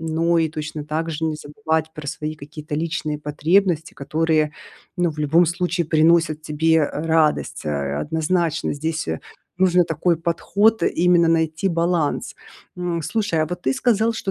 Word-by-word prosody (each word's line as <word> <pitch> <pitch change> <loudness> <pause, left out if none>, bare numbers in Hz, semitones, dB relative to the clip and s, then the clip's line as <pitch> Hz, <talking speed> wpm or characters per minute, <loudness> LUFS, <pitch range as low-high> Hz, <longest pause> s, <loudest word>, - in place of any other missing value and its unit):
но 165 +1 +1
и 160 -1 +2
точно 155 -1 -6
так 155 +2 -2
же 160 0 -3
не 155 -1 -1
забывать 160 0 -2
про 150 -3 -8
свои 155 +2 -4
какие-то 150 0 -8
личные 155 -1 -2
потребности, 160 +3 +1
которые, 155 +1 0 0.4
ну, 175 -2 +1
в 155 - -11
любом 160 +4 +3
случае 175 0 -1
приносят 160 0 +3
тебе, 155 +2 0
э, 150 - +1
радость, 160 -2 +1
э, 70 -1 -2
однозначно, 160 - 0
здесь 155 - -3 0.5
нужно 180 -1 +5
такой 165 +1 0
подход- 190 +5 +1
именно 175 0 +3
найти 160 +1 +1
баланс. 170 -3 0 0.4
М, 175 -2 -2
слушай, 205 -2 -1
а - - -1
вот 180 +2 -6
ты 130 - +1
сказал, 230 - +2
что 210 -3 -4
160 Hz, 155 wpm, -21 LUFS, 155-170 Hz, 0.5 s, нужно